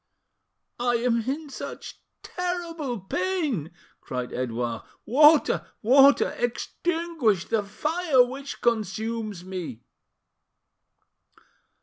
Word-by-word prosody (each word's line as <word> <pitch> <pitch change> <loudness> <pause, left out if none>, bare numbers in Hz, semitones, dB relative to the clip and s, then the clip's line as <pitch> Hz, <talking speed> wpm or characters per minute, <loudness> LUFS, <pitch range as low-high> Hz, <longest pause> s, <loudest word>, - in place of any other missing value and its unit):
"I 245 0 +1
am 235 0 0
in 295 +1 -4
such - - -8 0.2
terrible 335 - -4
pain!" 300 - -1 0.3
cried 125 -1 -5
Edouard. 120 -2 -2 0.2
"Water! 300 +5 +5 0.2
water! 275 +5 +6
Extinguish 270 - -1
the 225 -2 +2
fire 300 - +2
which 270 +2 -7
consumes 220 -3 -1
me!" 175 -11 -6
245 Hz, 80 wpm, -26 LUFS, 200-305 Hz, 0.3 s, water